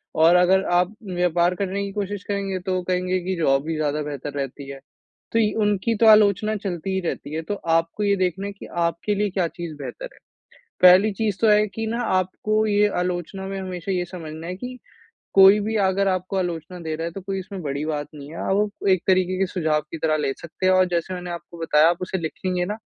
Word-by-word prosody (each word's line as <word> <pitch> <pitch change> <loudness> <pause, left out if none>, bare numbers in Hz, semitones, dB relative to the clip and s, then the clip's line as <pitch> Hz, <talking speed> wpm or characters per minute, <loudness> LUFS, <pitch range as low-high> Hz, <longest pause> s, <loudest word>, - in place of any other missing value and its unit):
और 165 +2 +5
अगर 185 +2 +4 0.2
आप 180 +4 -1 0.2
व्यापार 175 0 +2
करने 200 +1 -2
की 200 - -5
कोशिश 205 -1 -4
करेंगे, 200 -2 -2
तो 185 0 -2
कहेंगे 185 0 0
की 185 +1 -2
जॉब 135 -1 +2
ही 165 - -1
ज़्यादा 150 -1 -1
बेहतर 145 -1 -6
रहती 140 0 -5
है। 140 0 -8 0.5
तो 230 - +2
य 210 -2 +2
उनकी 210 +2 +1
तो 225 - +2
आलोचना 215 0 +5
चलती 195 -2 -4
ही 190 - +1
रहती 160 -4 -4
है। 160 - -2
तो 205 +6 -3 0.2
आपको 165 +5 -2
ये 200 -1 +3
देखना 185 +1 -1
है 200 - -6
कि, 200 - -11
आपके 170 +4 -1
लिए 205 +1 0
क्या 185 -2 0
चीज़ 170 -2 -7
बेहतर - - -7
है। - - -21 0.6
पहली 185 +4 +7
चीज़ 210 -1 -1
तो 225 - +4
है 210 0 +4
कि 225 +2 -5
ना, 230 +2 -2
आपको 215 +2 0
ये 210 0 +3 0.2
आलोचना 180 +2 -4
में 195 0 -4
हमेशा 185 0 -5
ये 180 -1 0
समझना 165 -2 -8
है 180 - -4
कि 250 +6 -8 0.6
कोई 195 +1 +8
भी 215 +2 -2
अगर 195 +1 +2
आपको 185 +1 -2
आलोचना 180 -1 -3
दे 160 -2 -4
रहा 165 +1 -3
है, - - -3
तो 195 - -7
कोई 195 +1 -4
इसमें 190 +1 -7
कोई 145 - -3
बड़ी 140 +2 -3
बात 150 -2 -3
नहीं 145 -1 -10
है। 165 - -8
और - - 0
वो 205 +1 +1 0.2
एक 185 -2 +3
तरीके 185 -1 +2
के 195 - +2
सुझाव 160 -4 0
की 165 - -4
तरह 155 0 +1
ले 140 -2 0
सकते 170 +3 -4
हैं 185 - +5
और 185 0 +4
जैसे 175 +1 -2
मैंने 180 0 -6
आपको 170 0 -8
बताया, 160 -1 +4
आप 175 - 0
उसे 185 +1 -2
लिखेंगे 180 +2 -2
ना। 210 +3 -3
185 Hz, 235 wpm, -23 LUFS, 165-200 Hz, 0.6 s, कोई